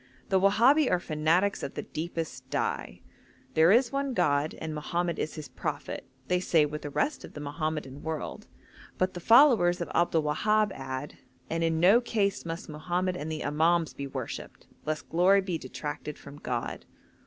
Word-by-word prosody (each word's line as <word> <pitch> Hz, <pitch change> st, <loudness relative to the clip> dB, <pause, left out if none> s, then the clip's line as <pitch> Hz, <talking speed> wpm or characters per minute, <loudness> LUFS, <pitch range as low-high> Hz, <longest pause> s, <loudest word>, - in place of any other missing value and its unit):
The 190 Hz, -2 st, +4 dB
Wahabi 240 Hz, +9 st, +5 dB
are 180 Hz, -, +2 dB
fanatics 170 Hz, +5 st, +1 dB
of -, -, -5 dB
the -, -, -4 dB
deepest 155 Hz, -6 st, -5 dB
dye; -, -, -2 dB, 0.5 s
'there 160 Hz, +3 st, +5 dB
is 240 Hz, +3 st, +4 dB
one 275 Hz, -2 st, -1 dB
God, 145 Hz, -2 st, +1 dB
and 160 Hz, -1 st, -5 dB
Mohammed 170 Hz, +3 st, -2 dB
is 155 Hz, -, -3 dB
his 155 Hz, -2 st, -7 dB
prophet,' -, -, -5 dB, 0.2 s
they 180 Hz, 0 st, +2 dB
say 165 Hz, -4 st, +3 dB
with 150 Hz, +1 st, -5 dB
the 145 Hz, -, -5 dB
rest 285 Hz, -, -1 dB
of -, -, -10 dB
the -, -, -8 dB
Mohammedan 145 Hz, -2 st, -4 dB
world, 160 Hz, -1 st, -5 dB, 0.5 s
but 185 Hz, 0 st, +1 dB
the 175 Hz, -, -6 dB
followers 225 Hz, -, +6 dB
of 170 Hz, -, -4 dB
Abdul 170 Hz, -2 st, +2 dB
Wahab 210 Hz, +8 st, +2 dB
add, 130 Hz, +1 st, -6 dB, 0.3 s
'and 165 Hz, 0 st, 0 dB
in 165 Hz, -1 st, +1 dB
no 195 Hz, +8 st, +6 dB
case 205 Hz, -6 st, 0 dB
must 165 Hz, 0 st, -5 dB
Mohammed 175 Hz, +4 st, -2 dB
and 160 Hz, -2 st, -4 dB
the 155 Hz, -, -3 dB
Imams 160 Hz, +3 st, +2 dB
be 140 Hz, -, -5 dB
worshipped -, -, -7 dB, 0.2 s
lest 155 Hz, 0 st, -2 dB
glory 185 Hz, +4 st, +4 dB
be 180 Hz, -4 st, -3 dB
detracted 150 Hz, 0 st, -6 dB
from 140 Hz, 0 st, -12 dB
God.' 120 Hz, -4 st, -3 dB
165 Hz, 175 wpm, -28 LUFS, 150-190 Hz, 0.5 s, followers